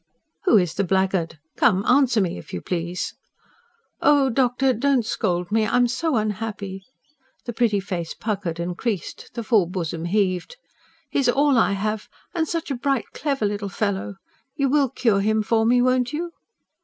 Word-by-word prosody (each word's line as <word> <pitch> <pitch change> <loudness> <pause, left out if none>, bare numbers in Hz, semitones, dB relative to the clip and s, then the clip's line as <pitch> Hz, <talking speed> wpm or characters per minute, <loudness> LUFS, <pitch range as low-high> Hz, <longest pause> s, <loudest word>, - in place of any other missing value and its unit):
"Who 360 - +6
is 180 -4 +1
the 200 +2 0
blackguard? 190 -3 0 0.2
Come, 190 +2 +3
answer 250 -4 +4
me, 175 - -2
if - - -13
you - - -3
please!" 175 0 -3 0.9
"Oh, 280 -3 +4
doctor, 255 +1 +2
don't 255 0 +1
scold 180 -5 -1
me... 220 0 +3
I 225 - 0
am 245 0 +4
so 275 +5 -1
unhappy." 210 -3 -3 0.6
The 240 - -4
pretty 220 -3 +2
face 180 -4 -4
puckered 195 -6 -3
and 175 +1 -3
creased; 210 -3 -4
the 235 - -3
full 215 -6 +3
bosom 170 -2 -4
heaved. 185 - 0 0.5
"He - - +1
is 260 -3 +2
all 280 +2 +3
I 225 -4 +3
have. 215 +2 -2 0.2
And 325 -3 0
such 330 -2 -3
a - - 0
bright, 270 -1 -1
clever 275 -7 -1
little 205 0 -2
fellow! 200 0 -2 0.4
You 275 -1 +1
will 280 -1 +3
cure 220 -5 +1
him 215 +1 +1
for 225 +1 +2
me, 245 +1 +4
won't 255 0 +1
you?" 340 +3 -3
215 Hz, 175 wpm, -23 LUFS, 190-255 Hz, 0.9 s, Who